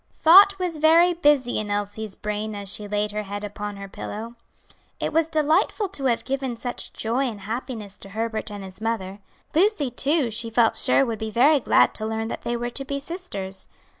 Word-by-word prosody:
Thought 390 Hz, +5 st, +7 dB
was 355 Hz, -4 st, -2 dB
very 335 Hz, +3 st, +5 dB
busy 290 Hz, -7 st, +2 dB
in 215 Hz, -1 st, -4 dB
Elsie's 205 Hz, 0 st, -3 dB
brain 210 Hz, 0 st, -4 dB
as 200 Hz, -1 st, -3 dB
she 210 Hz, -, -2 dB
laid 210 Hz, 0 st, -1 dB
her 210 Hz, +1 st, -3 dB
head 205 Hz, 0 st, -6 dB
upon 205 Hz, 0 st, -5 dB
her 200 Hz, 0 st, -8 dB
pillow. 220 Hz, +4 st, -7 dB, 0.7 s
It -, -, -2 dB
was 325 Hz, 0 st, +2 dB
delightful 320 Hz, +6 st, +1 dB
to 290 Hz, -8 st, -4 dB
have 235 Hz, -3 st, +1 dB
given 265 Hz, -3 st, -3 dB
such 245 Hz, +1 st, -3 dB
joy 245 Hz, +5 st, -1 dB
and 210 Hz, -3 st, -9 dB
happiness 220 Hz, -1 st, -5 dB
to 195 Hz, -, -10 dB
Herbert 220 Hz, +1 st, -3 dB
and 205 Hz, -1 st, -7 dB
his 190 Hz, +2 st, -10 dB
mother. 210 Hz, -4 st, -3 dB, 0.3 s
Lucy, 330 Hz, -, +2 dB
too, 275 Hz, 0 st, 0 dB
she 225 Hz, +1 st, -3 dB
felt 230 Hz, 0 st, +3 dB
sure 270 Hz, +1 st, +4 dB
would 225 Hz, -3 st, -4 dB
be 220 Hz, -, -3 dB
very 275 Hz, +7 st, +4 dB
glad -, -, +3 dB
to 215 Hz, -, -4 dB
learn 220 Hz, 0 st, -3 dB
that -, -, -5 dB
they 240 Hz, 0 st, -2 dB
were 240 Hz, +1 st, -3 dB
to 275 Hz, -, -2 dB
be 280 Hz, +1 st, -3 dB
sisters. 240 Hz, -, -7 dB
230 Hz, 200 wpm, -24 LUFS, 210-285 Hz, 0.7 s, Thought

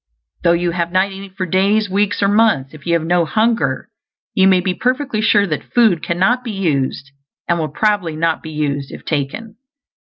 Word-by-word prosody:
Though 170 Hz, -1 st, +3 dB
you 175 Hz, 0 st, 0 dB
have 170 Hz, 0 st, -2 dB
not 190 Hz, +2 st, +1 dB
eaten 195 Hz, 0 st, -9 dB
for 185 Hz, -, -1 dB
days, 200 Hz, +4 st, +2 dB
weeks, 205 Hz, +1 st, 0 dB
or -, -, +4 dB
months, 205 Hz, -11 st, +2 dB
if 155 Hz, +1 st, -12 dB
you 170 Hz, -, +2 dB
have 165 Hz, -1 st, +1 dB
no 175 Hz, +1 st, +2 dB
hunger 225 Hz, +7 st, 0 dB, 0.5 s
you 190 Hz, 0 st, +4 dB
may 190 Hz, -1 st, +5 dB
be 180 Hz, 0 st, -1 dB
perfectly 255 Hz, 0 st, -1 dB
sure 205 Hz, -2 st, +4 dB
that 155 Hz, -6 st, -5 dB
food 220 Hz, -9 st, +4 dB
cannot 190 Hz, +9 st, +1 dB
be 240 Hz, -, -6 dB
used, 140 Hz, -7 st, -1 dB, 0.4 s
and 170 Hz, -1 st, +1 dB
will 155 Hz, -1 st, -2 dB
probably 190 Hz, 0 st, 0 dB
not 165 Hz, +1 st, 0 dB
be 160 Hz, -, -8 dB
used 145 Hz, -3 st, -3 dB
if -, -, -10 dB
taken. 185 Hz, +10 st, -3 dB
185 Hz, 195 wpm, -18 LUFS, 160-210 Hz, 0.5 s, may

